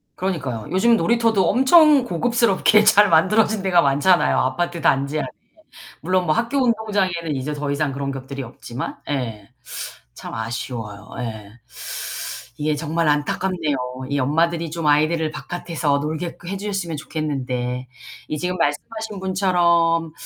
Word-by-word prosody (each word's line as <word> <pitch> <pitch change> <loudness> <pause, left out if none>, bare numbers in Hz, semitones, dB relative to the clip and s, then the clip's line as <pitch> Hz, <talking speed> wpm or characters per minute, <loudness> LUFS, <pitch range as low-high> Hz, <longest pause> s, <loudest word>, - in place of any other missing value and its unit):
그러니까요. 140 - -3
요즘은 230 +6 +4
놀이터도 225 0 +2
엄청 275 +3 +6
고급스럽게 215 +1 +3
잘 210 -1 +6
만들어진 205 +6 +3
데가 180 -3 +4
많잖아요. 145 +6 +3
아파트 170 +7 -1
단지 140 0 +1
안에. - - -2 0.7
물론 185 +2 +1
뭐 155 - +2
학교 240 - 0
운동장에는 200 - 0
이제 135 +3 -3
더 145 0 -4
이상 145 0 0
그런 140 0 -3
것들이 135 +1 -6
없지만 125 +1 -7
예 115 -7 -3 0.7
참 - - -8
아쉬워요. 110 -2 -5
예. 110 -4 -6 1.1
이게 150 0 0
정말 160 +2 -1
안타깝네요. 150 +1 0 0.3
이 140 - 0
엄마들이 165 +5 +1
좀 165 0 -5
아이들을 155 +2 +2
바깥에서 155 -2 -2
놀게끔 160 +4 -5
해 195 - -3
주셨으면 195 -5 -3
좋겠는데. 130 -5 -3 0.4
이 150 - -3
지금 180 +3 -2
말씀하신 205 +7 -3
분처럼 170 -3 +2
165 Hz, 330 characters per minute, -21 LUFS, 140-190 Hz, 1.1 s, 엄청